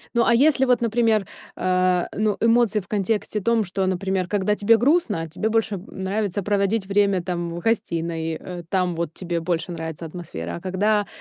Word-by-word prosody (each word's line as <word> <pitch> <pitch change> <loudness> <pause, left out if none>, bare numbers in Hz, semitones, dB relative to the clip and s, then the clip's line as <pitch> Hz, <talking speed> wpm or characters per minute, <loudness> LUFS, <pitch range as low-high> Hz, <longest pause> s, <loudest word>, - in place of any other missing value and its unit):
Ну, 235 - +4
а 235 - +4
если 275 0 +4
вот, 250 -2 +3
например, 225 -2 +2 0.3
э, 185 -1 +2
ну, 215 -1 +1
эмоции 230 -2 +3
в 195 - -12
контексте 210 +1 -1
том, 230 +2 +2
что, 190 +1 -2
например, 190 0 -1
когда 205 +1 +1
тебе 225 +2 +4
грустно, 240 - +1
тебе 195 +8 -2
больше, 225 -2 +1
м, 185 0 -8
нравится 200 +1 -2
проводить 200 +1 +1
время 200 -2 +2
там, 170 -2 -3
в 170 - -4
гостиной, 165 -6 -1
э, 180 -1 -7
там 185 -2 +1
вот 165 -1 -3
тебе 175 -2 -3
больше 165 0 -2
нравится 160 -1 -6
атмосфера, 85 - -6
а - - -11
когда 205 +3 +1
195 Hz, 180 wpm, -23 LUFS, 175-220 Hz, 0.3 s, Ну